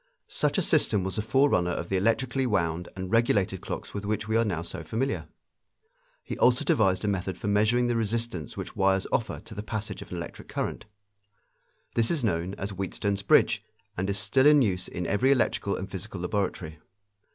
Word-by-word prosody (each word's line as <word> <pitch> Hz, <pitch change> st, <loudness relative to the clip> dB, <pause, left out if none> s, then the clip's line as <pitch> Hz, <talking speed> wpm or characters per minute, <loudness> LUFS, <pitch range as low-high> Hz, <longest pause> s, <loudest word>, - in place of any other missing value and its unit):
Such -, -, 0 dB
a -, -, +2 dB
system 100 Hz, -3 st, +3 dB
was 95 Hz, +2 st, -3 dB
the -, -, +1 dB
forerunner 110 Hz, -6 st, +3 dB
of 85 Hz, -1 st, -3 dB
the 95 Hz, -, 0 dB
electrically 120 Hz, +6 st, +1 dB
wound 85 Hz, -5 st, 0 dB
and 95 Hz, 0 st, -5 dB
regulated 105 Hz, -5 st, +2 dB
clocks -, -, -6 dB
with 100 Hz, -, -4 dB
which 105 Hz, +1 st, -2 dB
we 110 Hz, -, 0 dB
are 115 Hz, -, +4 dB
now 90 Hz, -7 st, -2 dB
so -, -, -6 dB
familiar. 130 Hz, +5 st, -2 dB, 1.0 s
He -, -, -5 dB
also 125 Hz, 0 st, +4 dB
devised 95 Hz, -3 st, +2 dB
a -, -, 0 dB
method 95 Hz, -2 st, -1 dB
for -, -, -8 dB
measuring 110 Hz, +4 st, +3 dB
the 120 Hz, 0 st, +1 dB
resistance 115 Hz, -6 st, -2 dB
which -, -, -6 dB
wires 95 Hz, 0 st, +2 dB
offer 110 Hz, -, -1 dB
to 110 Hz, -, -12 dB
the 105 Hz, -, -5 dB
passage 110 Hz, 0 st, -4 dB
of -, -, -10 dB
an -, -, -5 dB
electric -, -, -7 dB
current. -, -, -3 dB, 1.1 s
This 115 Hz, -1 st, +2 dB
is 160 Hz, -6 st, 0 dB
known 90 Hz, -2 st, 0 dB
as 100 Hz, +2 st, -5 dB
Wheatstone's 100 Hz, +1 st, -2 dB
bridge 100 Hz, -, +4 dB, 0.3 s
and 95 Hz, +2 st, -2 dB
is 100 Hz, -, 0 dB
still 130 Hz, +7 st, +3 dB
in 150 Hz, -2 st, +7 dB
use 90 Hz, -4 st, -1 dB
in 90 Hz, -, -4 dB
every 105 Hz, +9 st, +2 dB
electrical 120 Hz, -6 st, +1 dB
and 95 Hz, -, -5 dB
physical 95 Hz, -1 st, -7 dB
laboratory. 90 Hz, -5 st, -2 dB
100 Hz, 195 wpm, -27 LUFS, 95-115 Hz, 1.1 s, in